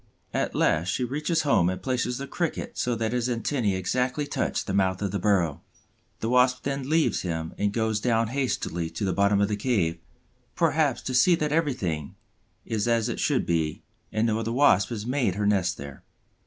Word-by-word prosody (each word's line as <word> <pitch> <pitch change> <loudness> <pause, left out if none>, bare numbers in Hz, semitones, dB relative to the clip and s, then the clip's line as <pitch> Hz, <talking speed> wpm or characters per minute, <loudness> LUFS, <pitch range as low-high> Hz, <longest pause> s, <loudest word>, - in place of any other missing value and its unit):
At - - -1
last 80 +2 +2
she 90 +7 0
reaches 150 +6 0
home 90 - +3
and 95 - -3
places 125 -1 -1
the 140 - -5
Cricket 165 +4 -3
so 120 -1 0
that 110 0 -2
his 125 0 0
antennæ 115 -4 0
exactly 125 +9 -1
touch 145 - -2
the 95 - -3
mouth 95 -1 +1
of 100 - -1
the 100 - -2
burrow. 90 -6 +1 0.6
The 115 - -1
Wasp 125 0 +3
then 140 -1 -3
leaves 160 0 +2
him 80 -2 -3
and 105 0 0
goes 110 -1 0
down 115 -1 +1
hastily 115 -10 -2
to 105 - -4
the 95 - 0
bottom 100 0 +3
of 100 - +3
the 105 - -1
cave, 100 -8 0 0.6
perhaps 155 -6 +1
to 130 - -3
see 175 +7 +5
that 150 -2 -2
everything 115 - -1 0.5
is 110 -1 -1
as 115 0 +2
it 120 - -3
should 145 -3 +1
be 80 -3 -1 0.3
and 110 +1 +1
no 110 -1 +1
other 115 0 -2
Wasp 115 -7 +4
has 110 -3 -4
made 125 -7 0
her 105 0 -1
nest 95 -4 +1
there. 70 0 -9
115 Hz, 195 wpm, -26 LUFS, 95-130 Hz, 0.6 s, see